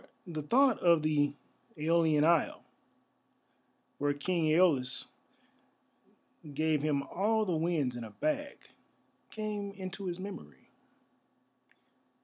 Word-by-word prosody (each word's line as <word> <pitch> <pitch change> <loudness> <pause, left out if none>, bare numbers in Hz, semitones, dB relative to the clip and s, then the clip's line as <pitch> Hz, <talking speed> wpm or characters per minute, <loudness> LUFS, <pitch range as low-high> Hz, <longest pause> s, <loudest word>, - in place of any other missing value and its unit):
For 175 - -10
the 155 -2 -3
thought 255 - +3
of 170 -3 +4
the 145 -2 +1 0.4
Æolian 160 -1 +3
isle, 165 0 +2 1.4
where 145 0 +1
King 170 +3 -1
Æolus 155 -6 +2 1.5
gave 155 -1 +1
him 145 -2 0
all 215 +8 0
the 180 -4 0
winds 155 -6 0
in 120 - -5
a 110 - -8
bag, 290 - -3 0.7
came 210 -2 -4
into 190 0 -6
his 175 0 -4
memory. 75 - -9
165 Hz, 110 wpm, -31 LUFS, 145-195 Hz, 1.5 s, of